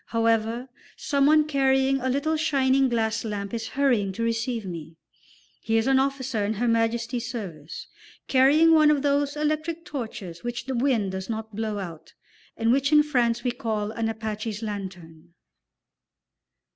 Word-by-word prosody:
However, 230 +1 0 0.3
someone 295 +2 +3
carrying 270 -2 +2
a 260 - -1
little 285 +5 0
shining 275 -4 +2
glass 225 -1 0
lamp 205 -2 -4
is 225 -1 -3
hurrying 250 -8 +1
to 230 - -3
receive 230 0 -1
me; 165 -3 -7 0.7
he 225 0 +1
is 225 - +1
an 265 0 +4
officer 265 -5 -1
in 205 +2 0
Her 235 +3 -1
Majesty's 230 +1 0
service, 175 - -7 0.4
carrying 290 +5 +5
one 310 -1 +6
of 295 -2 +2
those 285 0 +1
electric 310 +2 -2
torches 220 - -6
which 240 0 -4
the 265 - -3
wind 235 -6 +1
does 190 +2 -5
not 220 -1 -5
blow 215 -1 -2
out, 170 -5 -8 0.4
and 225 0 +2
which 275 +3 +2
in 300 0 +6
France 240 -5 +1
we 250 - +1
call 220 -4 -3
an 225 0 -2
Apache's 220 0 -4
lantern. 175 -5 -7
235 Hz, 155 wpm, -25 LUFS, 215-270 Hz, 0.7 s, one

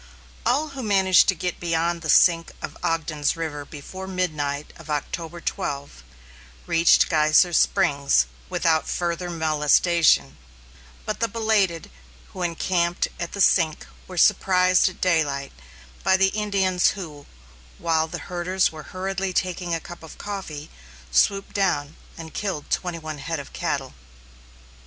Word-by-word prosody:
All 300 +5 +1
who 275 -2 -7
managed 190 -5 +4
to 190 - +3
get 180 +1 -4
beyond 170 0 -1
the 160 - -6
sink 165 0 +4
of - - -7
Ogden's 155 -2 -1
River 155 -3 -4
before 185 +7 -9
midnight 150 -6 -2
of 165 -2 -13
October 165 +3 -4
12, 140 - -4 0.6
reached 165 0 +4
Geyser 155 +2 +4
Springs 140 - +3 0.2
without 160 -1 +1
further 175 0 -2
molestation, 155 - +2 0.7
but 215 - -3
the 230 - +1
belated, 215 -7 0 0.4
who 185 - -9
encamped 175 0 0
at 170 - -5
the 200 - -2
sink 160 -5 +3 0.2
were 185 - -9
surprised 185 -1 +4
at 185 - -14
daylight 150 -6 +1 0.5
by 190 - +4
the 195 0 +4
Indians, 195 -3 +1
who, 150 -6 -9 0.5
while 160 -1 +1
the - - -6
herders 180 +1 0
were 155 -1 -9
hurriedly 190 0 -3
taking 180 -2 -1
a - - -3
cup 175 +1 -11
of 160 - -12
coffee, 165 -7 -6 0.4
swooped 195 -1 +2
down 160 -7 0 0.2
and 160 -1 -9
killed 190 -8 -4
twenty 180 -2 -1
one 155 -2 -7
head 165 +2 -3
of 140 - -10
cattle. - - -3
170 Hz, 140 wpm, -24 LUFS, 155-190 Hz, 0.7 s, managed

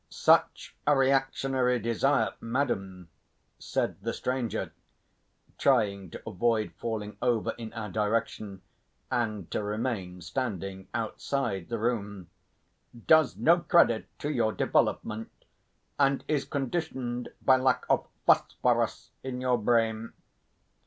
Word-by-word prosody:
"Such - - +2
a 145 -1 +5
reactionary 135 -1 +2
desire, 120 +5 +1
madam," 95 -8 -2 0.5
said - - -2
the - - -2
stranger, 125 -3 -2 0.9
trying 100 -8 +2
to - - -10
avoid 110 +1 0
falling 110 -2 -5
over 120 -3 +1
in 115 -2 -8
our 110 -3 -5
direction 105 -2 -2 0.5
and 110 -7 -2
to - - -1
remain 105 -4 -3
standing 95 -2 -4
outside 115 -11 -2
the 115 - -2
room, 105 -5 -3 0.7
"does 160 -3 +5
no 165 +10 +5
credit 170 -10 +3
to 145 - -3
your 110 -6 +1
development, 110 +1 -1 0.5
and 140 -1 +3
is 145 -3 0
conditioned 130 -4 -3
by 130 -1 +5
lack 130 0 +1
of - - +2 0.2
phosphorus - - +2
in 130 -1 -5
your 125 -1 +1
brain. 115 0 +1
115 Hz, 110 wpm, -28 LUFS, 105-130 Hz, 0.9 s, a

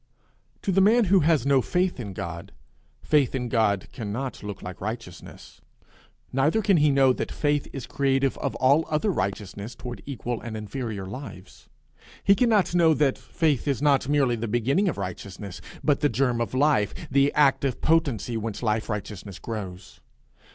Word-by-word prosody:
To 195 - 0
the 195 +1 +4
man 220 +4 +5
who 195 - +7
has 155 -5 +2
no 140 -2 +4
faith 180 +1 0
in 105 -5 -5
God, 85 -2 -6 0.5
faith 145 -4 +2
in 125 -2 -2
God 105 -5 +1
cannot 120 +4 -4
look 105 -1 -7
like 90 -1 -8
righteousness; 110 -4 -8 0.7
neither 150 +12 +2
can 195 -2 +4
he 150 -1 +4
know 135 -2 +4
that - - -4
it 145 -1 +2
is 135 -4 -6
creative 135 -1 +1
of - - -2
all 140 +5 +4
other 155 +7 +1
righteousness 100 - -4
toward 120 -5 -7
equal 120 -4 -4
and 110 -2 -6
inferior 110 -2 -5
lives: 100 -2 -10 0.5
he 200 - +6
cannot 215 -4 +2
know 165 -3 +4
that 140 -3 +1 0.2
it 150 -4 +2
is 140 -3 +1
not 140 -2 +2
merely 140 -4 +3
the 115 0 -4
beginning 130 - +1
of 155 - -4
righteousness, 95 0 -6 0.2
but 145 -2 +2
the 145 - +2
germ 120 -1 +1
of 115 - -3
life, 130 -7 +2 0.2
the 140 +1 +4
active 140 -3 +2
potency 140 -8 +1
whence 110 +1 -5
life 110 0 0
righteousness 100 -2 -5
grows. 95 -4 -7
130 Hz, 165 wpm, -25 LUFS, 105-145 Hz, 0.7 s, who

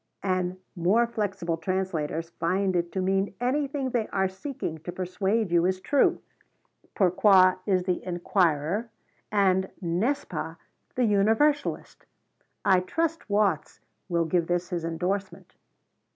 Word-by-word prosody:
and 185 -1 -1 0.2
more 195 +7 +3
flexible 195 -7 -2
translators 165 -4 -2
find 185 +3 +1
it 170 -1 0
to 190 - -3
mean 195 +1 0
anything 270 +1 -1
they 230 -3 0
are 190 -1 0
seeking 190 - -5
to 170 +3 -6
persuade 190 +3 -1
you 170 -1 +4
is 185 0 -1
true. 280 +8 +2 0.8
Pourquoi 185 0 +5
is 185 -3 +2
the 180 -1 -1
inquirer 175 +2 0 0.4
and 190 -2 +2
N'est 190 +11 0
ce - - -17
pas 160 -1 -5 0.4
the 250 - +2
universalist. 225 +8 +1 0.6
I 190 -2 +5
trust 325 - -2
Watts 205 -1 +1 0.3
will 170 -1 +1
give 170 0 +1
this 175 0 -1
his 175 -2 -3
endorsement." 185 +4 -3
190 Hz, 130 wpm, -27 LUFS, 175-210 Hz, 0.8 s, Pourquoi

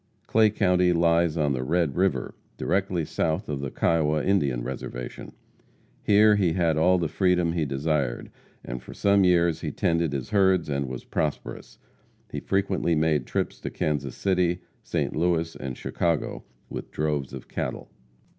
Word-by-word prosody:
Clay 110 -1 +4
county 90 -3 +2
lies 85 -1 +2
on 75 -3 +1
the 65 -1 -2
Red 80 0 0
river, 90 -9 0 0.2
directly 95 -4 0
south 80 +7 -1
of 75 -2 -3
the 70 - -3
Kiowa 75 0 +1
Indian 70 -11 +1
reservation. - - -6 0.7
Here 105 0 +5
he 90 -5 +2
had 85 -3 +2
all 90 +4 +4
the 85 -2 0
freedom 90 -1 +1
he 80 -3 0
desired, 70 -2 -1 0.3
and - - -5
for - - -11
some 100 -1 +3
years 85 -3 +3
he - - -2
tended 85 -2 0
his 70 +9 -4
herds 95 -5 +3
and 70 -1 -1
was 65 -1 -6
prosperous. 75 -2 -4 0.5
He - - -3
frequently 95 -3 0
made 80 -1 +1
trips - - -2
to - - -4
Kansas 70 -4 -2
City, 90 -2 +1 0.2
St. - - -2
Louis 80 0 0
and 65 -2 -6
Chicago 85 -3 -2 0.2
with - - -7
droves 75 -3 -2
of - - -9
cattle. - - -5
85 Hz, 155 wpm, -26 LUFS, 75-90 Hz, 0.7 s, Here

